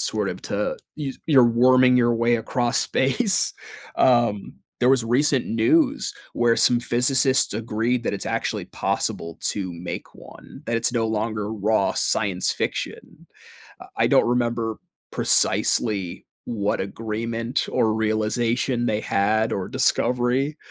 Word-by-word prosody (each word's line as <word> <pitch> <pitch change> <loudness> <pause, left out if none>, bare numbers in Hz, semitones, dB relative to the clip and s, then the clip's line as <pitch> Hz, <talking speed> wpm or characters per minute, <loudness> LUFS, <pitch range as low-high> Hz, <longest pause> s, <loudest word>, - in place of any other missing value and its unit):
sort - - -1
of - - -6
to - - -2 0.2
you 140 -3 -4
you're 135 -6 +6
worming 125 +2 +4
your 120 -1 +3
way 115 +1 +2
across 120 +2 -1
space. 190 - +1 0.4
Um, 120 -5 +2 0.3
there 125 - +3
was 130 -3 +3
recent 130 +2 +1
news 270 - +1 0.2
where 120 -1 +2
some 120 -1 +4
physicists 130 0 +2
agreed 115 +2 -1
that - - -2
it's 100 - -5
actually - - -2
possible 85 -1 -3
to 95 -3 -2
make 85 +1 -7
one, - - -14
that 115 - -1
it's 115 +1 0
no 115 -2 0
longer 110 -1 -2
raw 105 -1 +1
science 95 -4 0
fiction. - - -5 0.7
I - - +2
don't - - +4
remember 120 -2 -1 0.3
precisely 100 -6 +1 0.2
what 105 -4 -2
agreement 115 +4 -3
or 110 -1 +1
realization 115 +3 0
they 105 - 0
had 110 +2 0
or 95 -2 -3
discovery, 125 +5 0
115 Hz, 130 wpm, -23 LUFS, 110-125 Hz, 0.7 s, you're